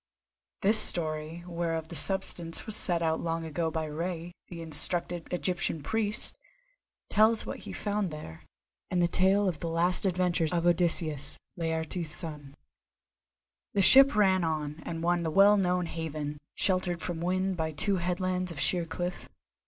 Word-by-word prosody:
This 215 +3 +7
story, 160 0 +4
whereof 165 -2 -3
the 170 - -8
substance 175 -3 0
was 220 - -2
set 175 -5 0
out 160 0 0
long 165 0 -3
ago 160 +1 -2
by 160 0 -3
Rei, 170 +2 -5
the 170 - -9
instructed 165 +2 -3
Egyptian 180 -3 -2
priest, 215 +4 -1 0.8
tells 220 +1 +3
what - - -6
he - - -9
found 205 -2 -2
there, 150 - -9 0.5
and 180 - -1
the 175 - +3
tale 190 +3 +2
of 170 -5 -2
the 170 - -4
last 175 +4 +1
adventures 180 -3 0
of 170 -1 -1
Odysseus, 160 -4 +2 0.2
Laertes' 160 0 -3
son. 150 -3 -2 1.2
The 200 - +3
ship 270 +5 +8
ran 190 -3 +3
on 155 -1 -3
and 165 -1 -5
won 175 0 +1
the 165 - -2
well 200 +5 +5
known 180 -2 0
haven, 155 -3 -5 0.2
sheltered 185 -2 -1
from 165 -1 -5
wind 185 +2 -1
by 160 -2 -2
two 195 +6 -1
headlands 180 +1 -2
of 155 - -8
sheer 175 0 0
cliff. 175 +2 -5
175 Hz, 155 wpm, -28 LUFS, 160-185 Hz, 1.2 s, ship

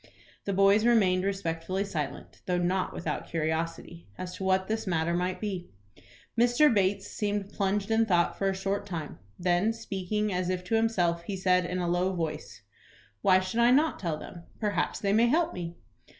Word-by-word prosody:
The 200 - -1
boys 195 +2 +5
remained 195 -6 +3
respectfully 190 0 -2
silent, 155 -7 -5
though 180 -1 +1
not 180 +2 0
without 155 -3 -4
curiosity 165 +1 -3
as 180 0 -6
to - - -6
what 190 0 +2
this 220 -1 -2
matter 170 -1 +1
might 180 +1 -1
be. 190 -4 -4 0.7
Mr. 245 +4 +4
Bates 195 -1 +1
seemed 205 -1 -2
plunged 200 +1 0
in 225 0 +3
thought 175 -3 +2
for 195 - 0
a 190 - -1
short 195 +1 -2
time. 160 - -5 0.2
Then 180 +4 +2
speaking, 210 -1 -2
as 180 0 -1
if 180 -1 -2
to 205 +5 -1
himself, 180 -7 +1
he 195 0 -3
said, 180 -1 +2
in 180 - -3
a 180 -1 -1
low 180 +2 +1
voice, 165 -3 -5 0.6
"Why 185 -1 +5
should 185 +5 -3
I 235 0 +6
not 300 +5 +3
tell 165 -5 -2
them? 170 +2 -10
Perhaps 210 -2 0
they 200 -1 +1
may 230 +3 +5
help 320 +7 +2
me." 170 -1 -5
190 Hz, 180 wpm, -28 LUFS, 175-205 Hz, 0.7 s, I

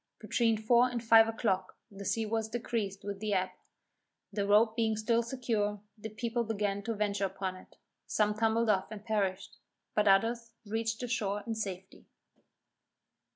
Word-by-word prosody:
Between 230 -2 +1
four 240 +3 +4
and 240 -2 -4
five 225 -1 +7
o'clock 190 -4 -1
the 200 0 -9
sea 225 +3 0
was 220 0 -1
decreased 220 -4 -3
with 200 -1 -5
the 210 -1 -1
ebb; 185 0 0 0.8
the 200 -1 -1
rope 220 +2 +4
being 220 -2 +1
still 230 +2 +2
secure, 230 -4 -1 0.2
the 220 0 -7
people 235 +2 -2
began 205 -2 -1
to 230 -1 -1
venture 200 -1 0
upon 190 -1 -3
it; 185 - -15 0.3
some 210 -1 +2
tumbled 225 +1 +1
off 190 -2 0
and 210 -1 -9
perished, 200 -4 -1 0.4
but 210 0 +2
others 230 +4 +2
reached 225 +2 -2
the 245 - -3
shore 205 -3 -1
in 230 - -2
safety. 195 -3 -6
215 Hz, 160 wpm, -31 LUFS, 200-230 Hz, 0.8 s, five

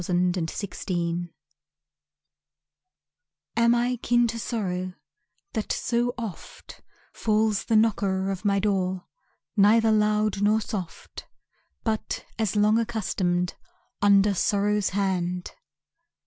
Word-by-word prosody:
Kin 180 +1 +1
to 175 -3 -2
Sorrow 175 -2 -3 2.3
Am 235 0 +4
I 245 +1 +1
kin 240 +1 +2
to 230 +1 -4
Sorrow, 185 -6 -3 0.6
That 220 -4 -2
so 240 0 0
oft 220 -8 -8 0.3
Falls 215 -2 +1
the 225 - +1
knocker 195 -3 +2
of 190 0 -5
my 200 -1 +2
door 190 -2 0 0.5
Neither 220 +2 +5
loud 210 -1 +2
nor 210 +2 +4
soft, 190 -6 -7 0.6
But 220 -1 -2
as 220 -2 0
long 210 +2 +4
accustomed, 185 -6 -1 0.5
Under 200 0 +5
Sorrow's 205 +1 +1
hand? 180 -2 -1
205 Hz, 105 wpm, -26 LUFS, 185-220 Hz, 2.3 s, Neither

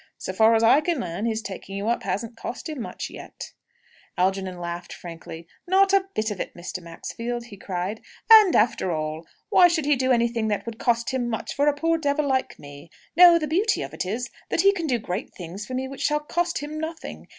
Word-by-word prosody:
So 185 - -5
far 220 +3 +5
as 225 - +2
I 250 +6 +6
can 330 -1 -1
learn, 185 +3 -3
his 220 -1 -2
taking 195 -1 -7
you 200 +2 -3
up 235 - +1
hasn't 230 +3 -3
cost 240 - -6
him 305 -5 -5
much - - -6
yet." - - -9 0.7
Algernon 190 0 0
laughed 175 0 -6
frankly. 165 -1 -9 0.2
"Not 385 +1 +4
a 390 -1 +4
bit 215 0 0
of 200 - -5
it, - - -5
Mr. 180 +1 -6
Maxfield!" 230 +8 -5
he 215 - -11
cried. 190 +2 -4 0.3
"And, 430 -5 +9
after 210 -4 +2
all, 155 0 -4 0.2
why 360 - +7
should 330 -4 0
he 295 0 +4
do 260 0 +1
anything 235 -2 +1
that 210 -2 -1
would 230 -1 -7
cost 235 0 +1
him 250 -2 -1
much, 225 - -3
for 285 +1 +1
a 295 - +3
poor 330 +2 +1
devil 290 0 0
like 260 -2 0
me? 145 +2 -12 0.3
No; 345 0 +9
the 315 - -1
beauty 370 +9 +1
of - - -8
it - - -2
is, 230 +6 -4 0.2
that - - +2
he 395 +1 +5
can 340 -5 -3
do 250 -4 +2
great 200 -2 -5
things 185 +4 -7
for 255 - -4
me 260 +1 -2
which 275 0 -8
shall 300 0 +1
cost 345 +3 -1
him 305 +1 -5
nothing! 320 +1 -6
235 Hz, 225 wpm, -24 LUFS, 190-300 Hz, 0.7 s, And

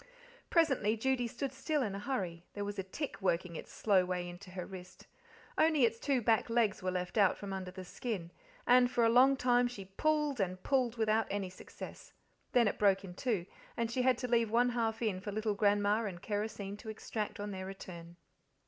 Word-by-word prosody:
Presently 270 - +3
Judy 250 +1 +1
stood 265 +3 -4
still 285 +2 0
in 205 -4 -2
a 200 - -4
hurry; 190 -8 -3
there 205 0 -3
was 205 -1 -4
a - - -1
tick 270 +10 -5
working 175 -2 0
its - - -8
slow 195 -4 +3
way 180 -1 -2
into 175 +2 -10
her 180 -1 -5
wrist. 185 -1 -11 0.5
Only 315 -5 +5
its 230 0 -1
two 270 -3 +1
back 225 +1 +3
legs 230 -4 +2
were 185 - -1
left 180 +3 -2
out 195 -3 +4
from 200 -1 -6
under 190 -1 -4
the 185 0 -8
skin, 185 -4 -4 0.3
and 245 0 +6
for 240 -1 +1
a - - +5
long 260 +3 +6
time 245 -1 +3
she 215 -6 -7
pulled 300 +6 0
and 185 -1 -2
pulled 250 -4 +1
without 220 0 +2
any 195 -2 -2
success. 185 - -10 0.4
Then 240 -3 +4
it - - -2
broke 195 -1 +4
in 180 - -8
two, 200 -3 -1 0.3
and 230 -1 -1
she 255 - 0
had 255 -1 +3
to 250 - -3
leave 230 -2 +2
one 240 +3 +3
half 230 -1 -1
in 205 -5 0
for 205 - -5
little 215 +1 0
Grandma 205 +1 +2
and 185 -4 -5
kerosene 205 0 -3
to 220 - -9
extract 215 0 -4
on 205 0 -4
their 190 -1 -5
return. 175 -3 -9
215 Hz, 210 wpm, -33 LUFS, 190-245 Hz, 0.5 s, and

